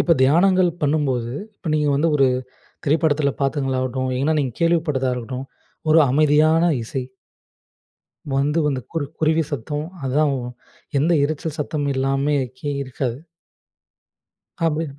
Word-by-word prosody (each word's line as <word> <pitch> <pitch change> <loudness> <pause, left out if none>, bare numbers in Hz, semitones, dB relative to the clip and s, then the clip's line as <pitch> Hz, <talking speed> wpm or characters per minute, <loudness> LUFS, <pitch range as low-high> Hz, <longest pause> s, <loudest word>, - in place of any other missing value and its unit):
இப்போ 170 - +3
தியானங்கள் 180 +6 +4
பண்ணும்போது 135 -5 0 0.2
இப்போ 165 - -5
நீங்க 150 -1 +1
வந்து 150 +4 +2
ஒரு 135 -2 +4 0.6
திரைப்படத்துல 145 -1 +2
பாத்ததுங்களாகட்டும், 130 -2 -1
ஏன்னா 155 +3 +2
நீங்க 130 -5 -2
கேள்விப்பட்டதா 155 -6 +1
இருக்கட்டும், 125 +2 -5 0.4
ஒரு 160 +1 +7
அமைதியான 155 +4 +4
இசை 125 +3 -4 1.3
வந்து 145 +4 +1
வந்து 135 -3 -1
குரு 165 -3 -2
குருவி 160 +1 +2
சத்தம். 145 +3 -3 0.2
அதான் 145 +2 +2 0.7
எந்த 160 +5 +2
இரைச்சல் 155 +1 -2
சத்தமும் 145 -1 -1
எல்லாமே 135 +2 +1 0.2
கே 145 - -3
இருக்காது! 130 -2 -3 1.5
அப்டி 160 0 +1
145 Hz, 115 wpm, -21 LUFS, 135-155 Hz, 1.5 s, ஒரு